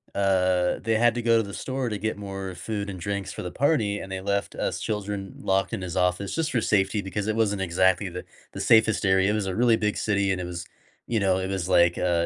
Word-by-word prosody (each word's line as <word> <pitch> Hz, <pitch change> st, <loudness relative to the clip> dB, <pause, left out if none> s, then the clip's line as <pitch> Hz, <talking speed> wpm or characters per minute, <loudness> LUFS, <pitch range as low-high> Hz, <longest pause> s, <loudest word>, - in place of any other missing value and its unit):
uh, 95 Hz, -2 st, +2 dB
they 115 Hz, -1 st, 0 dB
had 120 Hz, 0 st, +3 dB
to 120 Hz, -, -1 dB
go 115 Hz, 0 st, +4 dB
to 115 Hz, -, +2 dB
the 100 Hz, -1 st, -8 dB
store 130 Hz, -1 st, -3 dB
to 105 Hz, -, -3 dB
get 110 Hz, +1 st, -3 dB
more 95 Hz, -2 st, -6 dB
food 100 Hz, +3 st, -4 dB
and 95 Hz, -2 st, -6 dB
drinks 100 Hz, +1 st, -3 dB
for -, -, -6 dB
the 90 Hz, -, -5 dB
party, 110 Hz, -, +1 dB
and 95 Hz, -, -8 dB
they 95 Hz, -, -3 dB
left 100 Hz, +1 st, -1 dB
us -, -, -2 dB
children 100 Hz, -2 st, -4 dB
locked 95 Hz, 0 st, 0 dB
in -, -, -3 dB
his 90 Hz, -2 st, -5 dB
office 90 Hz, +2 st, 0 dB
just 165 Hz, -1 st, -1 dB
for 120 Hz, -, +1 dB
safety 100 Hz, 0 st, +1 dB
because 100 Hz, +2 st, -4 dB
it 110 Hz, -, 0 dB
wasn't 105 Hz, -3 st, +1 dB
exactly 95 Hz, +1 st, +2 dB
the 90 Hz, +1 st, -7 dB, 0.3 s
the -, -, -6 dB
safest 110 Hz, -1 st, +4 dB
area. 95 Hz, +1 st, +3 dB
It -, -, 0 dB
was 105 Hz, -2 st, -1 dB
a 95 Hz, -, -2 dB
really 115 Hz, 0 st, +4 dB
big 105 Hz, -1 st, 0 dB
city 100 Hz, -2 st, +1 dB
and 95 Hz, -, -1 dB
it -, -, -4 dB
was 85 Hz, -1 st, -6 dB, 0.4 s
you 115 Hz, -2 st, 0 dB
know, 95 Hz, -2 st, +2 dB
it 95 Hz, 0 st, -3 dB
was 95 Hz, -2 st, -2 dB
like, 85 Hz, -1 st, +4 dB
uh, 85 Hz, -2 st, +1 dB
100 Hz, 255 wpm, -25 LUFS, 95-110 Hz, 0.4 s, go